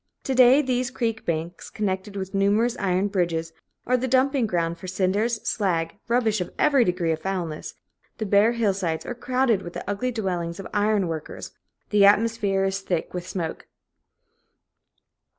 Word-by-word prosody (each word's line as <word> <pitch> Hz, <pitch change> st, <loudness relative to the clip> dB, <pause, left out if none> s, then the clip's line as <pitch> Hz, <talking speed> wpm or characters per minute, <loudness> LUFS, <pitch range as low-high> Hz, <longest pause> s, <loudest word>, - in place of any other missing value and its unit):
To 265 Hz, -, -1 dB
day, 260 Hz, +3 st, +6 dB
these 250 Hz, -1 st, 0 dB
creek 230 Hz, -4 st, -3 dB
banks, 170 Hz, +1 st, -3 dB
connected 200 Hz, -1 st, -3 dB
with 190 Hz, 0 st, -5 dB
numerous 205 Hz, +5 st, +2 dB
iron 185 Hz, +1 st, +1 dB
bridges, 170 Hz, -4 st, -1 dB, 0.3 s
are 250 Hz, -, +2 dB
the 255 Hz, +1 st, -2 dB
dumping 260 Hz, -1 st, +2 dB
ground 170 Hz, -3 st, -1 dB
for 185 Hz, -, -8 dB
cinders, 200 Hz, +5 st, 0 dB
slag, 165 Hz, -6 st, 0 dB
rubbish 225 Hz, -4 st, +1 dB
of 180 Hz, -, -4 dB
every 280 Hz, -4 st, +4 dB
degree 180 Hz, -4 st, 0 dB
of 160 Hz, 0 st, -2 dB
foulness; 175 Hz, -4 st, -4 dB, 0.4 s
the 220 Hz, -, -3 dB
bare 205 Hz, +3 st, +4 dB
hillsides 195 Hz, -8 st, -1 dB
are -, -, -4 dB
crowded 245 Hz, -3 st, +1 dB
with 175 Hz, -2 st, -8 dB
the -, -, -7 dB
ugly 210 Hz, +5 st, -1 dB
dwellings 180 Hz, -6 st, -3 dB
of 195 Hz, -, -7 dB
iron 205 Hz, -2 st, +2 dB
workers; 160 Hz, -2 st, -6 dB, 0.4 s
the 205 Hz, -1 st, +5 dB
atmosphere 205 Hz, -1 st, +3 dB
is 195 Hz, 0 st, 0 dB
thick 180 Hz, -4 st, -3 dB
with 180 Hz, 0 st, -5 dB
smoke. 175 Hz, -4 st, -4 dB
200 Hz, 160 wpm, -24 LUFS, 180-230 Hz, 0.4 s, day